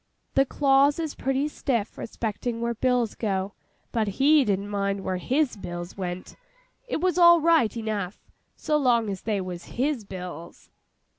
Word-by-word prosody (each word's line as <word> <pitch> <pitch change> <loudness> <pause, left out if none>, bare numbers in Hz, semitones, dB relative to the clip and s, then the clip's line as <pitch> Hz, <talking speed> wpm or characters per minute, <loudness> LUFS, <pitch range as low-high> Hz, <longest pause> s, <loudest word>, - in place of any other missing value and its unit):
The 270 0 +3
clause 280 +1 +3
is 320 -3 -3
pretty 270 +2 -1
stiff 240 -7 -2
respecting 230 +1 -4
where 235 0 -1
bills 245 -1 +1
go; 195 -2 -2 0.4
but 220 -2 0
he 290 +2 +5
didn't 200 -2 -1
mind 200 -1 -1
where 185 - -1
his 260 - 0
bills 175 -3 -7
went. 180 -1 -5 0.5
It 475 - -2
was 360 -1 +1
all 345 -1 +8
right 315 -9 +3
enough, 210 -4 -4 0.2
so 300 - 0
long 235 -6 +2
as 190 - -5
they 210 -2 -1
was 180 -2 -6
his 265 -2 0
bills! 180 -4 -9
230 Hz, 155 wpm, -26 LUFS, 195-275 Hz, 0.5 s, all